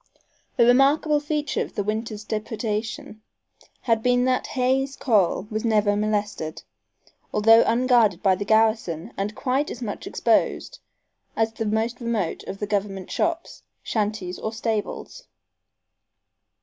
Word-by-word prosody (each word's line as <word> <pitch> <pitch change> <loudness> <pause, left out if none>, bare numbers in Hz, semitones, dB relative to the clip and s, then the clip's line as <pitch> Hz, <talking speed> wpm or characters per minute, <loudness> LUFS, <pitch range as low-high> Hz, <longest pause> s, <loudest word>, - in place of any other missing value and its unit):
A 235 - +6
remarkable 280 +5 +4
feature 295 0 -2
of - - -5
the 205 - -1
winter's 215 +1 -3
depredation 215 0 -4 0.6
had 230 -3 +1
been 245 +1 +2
that 255 0 +1
Hay's 265 +2 +1
corral 210 -5 +1
was 215 0 -2
never 210 -3 +2
molested, 205 -6 -2 0.7
although 225 +2 +6
unguarded 230 -5 +3
by 190 - +5
the 190 +2 -2
garrison 220 -6 +1
and 205 +2 -3
quite 270 +4 0
as - - -7
much 210 - -5
exposed - - 0 0.6
as 225 0 0
the 225 0 -3
most 225 +3 -1
remote 225 -7 -2
of 195 - -6
the 210 - -3
government 200 -2 -3
shops, 335 0 -2 0.2
shanties 210 -4 -2
or 220 - -3
stables. 220 -1 -4
220 Hz, 130 wpm, -24 LUFS, 210-245 Hz, 0.7 s, A